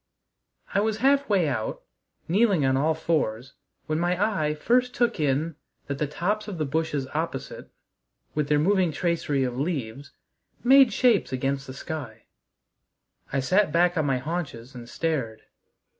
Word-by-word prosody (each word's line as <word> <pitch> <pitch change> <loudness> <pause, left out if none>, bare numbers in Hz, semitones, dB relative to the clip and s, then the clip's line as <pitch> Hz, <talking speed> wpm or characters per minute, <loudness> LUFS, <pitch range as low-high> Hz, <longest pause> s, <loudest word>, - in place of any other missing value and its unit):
I 200 - +3
was 215 +1 0
halfway 260 - +3
out, 110 -6 -3 0.4
kneeling 195 -4 +3
on 130 0 +2
all 155 +4 +2
fours, 135 -6 -1 0.3
when 155 +1 -1
my 175 +1 0 0.2
eye 150 0 0
first 250 +9 +1
took 240 -7 +1
in 150 +2 0 0.3
that 140 -1 -4
the 150 - 0
tops 205 +9 -2
of 200 -4 -5
the 155 - -1
bushes 150 -1 -1
opposite, - - -4 0.6
with 150 -1 -1
their 150 - +4
moving 185 +2 +2
tracery 150 -3 0
of 125 0 -3
leaves, 140 -4 -3 0.5
made 270 +2 +7
shapes 240 - +2
against 135 +1 -2
the 130 - -7
sky. 135 -8 -7 1.1
I 135 - 0
sat 185 +6 +2
back 175 +2 +3
on 155 -3 +1
my 135 -2 +2
haunches 135 -4 -5
and 120 -2 -10
stared. 135 -10 -2
155 Hz, 150 wpm, -26 LUFS, 135-185 Hz, 1.1 s, made